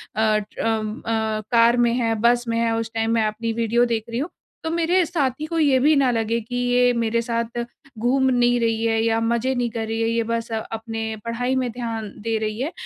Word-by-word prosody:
अ, 215 -1 +3
ट्र 210 0 -6
अम, 220 -1 -1
अ, 220 -1 -1
car 235 0 +5
में 240 -1 +3
है 230 -2 +1
बस 240 +1 +3
में 230 0 0
है 230 -1 +1
उस 225 0 -3
टाइम 225 0 0
मैं 225 -1 +2
अपनी 225 +2 -3
वीडियो 235 +1 +2
देख 230 -2 -1
रही 230 +2 -2
हूँ। 315 +6 -2 0.3
तो 320 - -2
मेरे 340 +2 +2
साथी 300 -3 -1
को 330 0 -2
ये 285 -4 +4
भी 300 +3 +4
ना 270 -2 +3
लगे 230 0 0
कि 245 +3 -7
ये 245 0 +3
मेरे 230 0 0
साथ 235 0 -2 0.4
घूम 260 +3 +2
नहीं 245 0 +3
रही 225 -1 0
है 225 -1 +2
या 225 0 +2
मज़े 235 +3 +1
नहीं 245 -1 0
कर 225 -1 -3
रही 225 0 -2
है, 225 - +1
ये 230 0 +1
बस 230 0 -3
अपने 225 0 -4
पढ़ाई 245 +3 -1
में 255 -2 0
ध्यान 225 -3 -5
दे 225 0 -1
रही 215 +1 -3
है। 305 +6 -2
230 Hz, 230 wpm, -22 LUFS, 225-245 Hz, 0.4 s, car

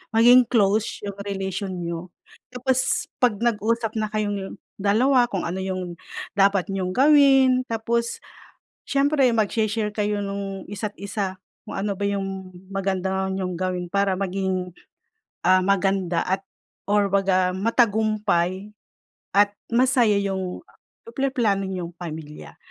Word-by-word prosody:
Maging 245 +3 +7
close 215 -2 +2
yung 200 - -5
relation 195 -1 -3
niyo. 170 +1 -5 0.4
Tapos 255 +1 0
pag 240 -5 +3
nag-usap 230 0 0
na 215 - -1
kayong 205 -2 -3 0.2
dalawa, 240 +6 +3
kung 195 - -2
ano 185 +3 -3
yung 185 -2 -4 0.4
dapat 195 -1 +3
niyong 185 -1 -2
gawin 270 -2 +5
tapos, 235 +1 -1 0.7
siyempre 280 -1 +3
magshe-share 215 0 0
kayo 210 -1 0
nung 195 -1 -5
isa't 205 +1 -4
isa 195 -2 -3 0.3
kung - - -6
ano 200 +1 -1
ba 200 - -2
yung 195 -2 -4 0.2
maganda 190 -1 -1
niyong 185 -2 -3
gawin. 180 0 -2
Para 200 +1 +1
maging, 190 -2 -2 0.7
ah, 185 0 +6
maganda 195 -2 +1
at 190 +1 -1 0.5
or 205 0 +3
baga 190 -2 +2
matagumpay, 210 -3 +1 0.6
at 205 +1 +4 0.2
masaya 240 -3 +3
yung 190 -2 -3 0.7
plano 205 -7 +1
niyong 175 -2 -5
pamilya. 155 -3 -8
200 Hz, 120 wpm, -23 LUFS, 190-220 Hz, 0.7 s, Maging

